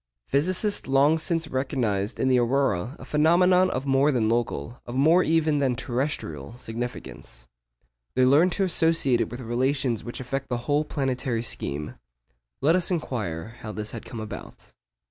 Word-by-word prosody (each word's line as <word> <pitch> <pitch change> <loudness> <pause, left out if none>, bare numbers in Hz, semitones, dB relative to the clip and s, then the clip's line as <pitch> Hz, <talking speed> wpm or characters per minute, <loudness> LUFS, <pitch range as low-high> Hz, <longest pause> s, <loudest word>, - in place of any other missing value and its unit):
Physicists 185 - 0
long 140 +4 +4
since 165 0 -1
recognised 125 -7 -1
in 130 - +1
the 130 -1 +4
aurora 120 -2 +1
a - - -11
phenomenon 180 +4 +4
of 130 +2 -3
more 135 +2 +3
than 115 -5 +1
local, 115 - -2
of 120 - -6
more 160 +7 +5
even 160 -3 +2
than 130 -3 +1
terrestrial, 120 - -3
significance. 120 0 -7 0.7
They 130 0 +4
learned 150 +8 +5
to 200 - 0
associate 165 -8 +2
it - - -1
with 120 +1 -7
relations 125 0 0
which 120 - -7
affect 135 +2 -4
the 120 - 0
whole 150 +1 +1
planetary 130 -5 -2
scheme. 75 - -4 0.6
Let 160 +4 +4
us 185 -2 0
inquire 110 - -3
how 110 -1 -6
this 105 0 -5
had - - -7
come 115 - -8
about. 110 -1 -9
130 Hz, 160 wpm, -25 LUFS, 120-155 Hz, 0.7 s, more